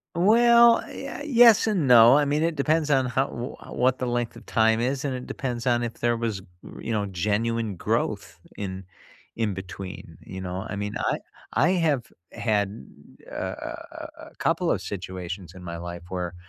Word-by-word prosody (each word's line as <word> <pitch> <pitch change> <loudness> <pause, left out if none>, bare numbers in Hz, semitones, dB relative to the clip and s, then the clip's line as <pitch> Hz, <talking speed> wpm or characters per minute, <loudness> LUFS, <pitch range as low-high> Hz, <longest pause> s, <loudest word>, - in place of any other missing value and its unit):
Well, 235 +5 +6
ye 275 - -7
yes 240 -7 +6
and 190 -10 +1
no. 120 +2 +8
I 150 - +3
mean, 150 +2 +1
it 165 -1 0
depends 150 +1 +1
on 135 -2 +3
how 130 +2 +1
w 120 +3 -6
what 130 +1 +1
the 130 - -2
length 120 -1 -2
of - - -13
time 110 0 +3
is, 130 +4 -1
and 135 -3 -2
it 125 - -6
depends 120 -3 -4
on 120 -1 +2
if 120 -1 -3
there 120 0 +1
was, 115 -4 -2 0.4
you - - -5
know, 105 -2 0
genuine 105 +3 -1
growth 85 - -2 0.2
in 95 -1 -5 0.5
in 110 -4 -1
between. 95 0 -8
You 95 - -8
know? 95 +2 -4
I - - -4
mean, 105 +1 -3
I - - 0 0.4
I 145 +8 +3
have 155 - 0 0.2
had, 105 -1 -1 0.5
uh, - - -8
a - - -5 0.5
a - - -10
a - - -25
couple - - 0
of - - +1
situations 90 -2 -6
in 90 - -11
my 85 -1 -6
life 85 0 -7
where 90 -2 -4
115 Hz, 185 wpm, -25 LUFS, 95-140 Hz, 0.5 s, no